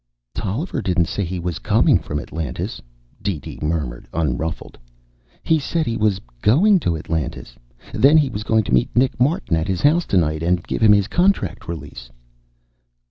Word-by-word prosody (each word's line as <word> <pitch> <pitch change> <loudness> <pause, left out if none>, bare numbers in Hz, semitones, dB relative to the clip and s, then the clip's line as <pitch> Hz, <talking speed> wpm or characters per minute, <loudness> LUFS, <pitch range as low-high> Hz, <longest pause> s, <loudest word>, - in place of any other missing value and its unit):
"Tolliver 110 - -3
didn't 90 -2 +1
say 100 +5 -3
he 90 0 -4
was 85 -2 -4
coming - - +3
from 75 - -4
Atlantis," 80 0 -5 0.4
DeeDee 95 -8 -4
murmured, 75 -6 -3
unruffled. 80 0 -3 0.7
"He 160 -1 +2
said 160 +3 -1
he 115 - -2
was 105 -3 +1 0.2
going 185 - +4
to 85 - -1
Atlantis. 75 -6 -4 0.4
Then 145 +4 +5
he 145 -4 +2
was 105 - -4
going 110 0 +2
to 65 - -3
meet 60 - +3
Nick 130 +2 +2
Martin 125 - +1
at 80 +2 -1
his 95 -1 -2
house 165 +4 +3
tonight 80 -4 +1
and 85 +1 +1
give - - -4
him 110 -2 +6
his 100 -1 +2
contract 185 - 0
release." 80 -7 -8
95 Hz, 165 wpm, -21 LUFS, 80-125 Hz, 0.7 s, him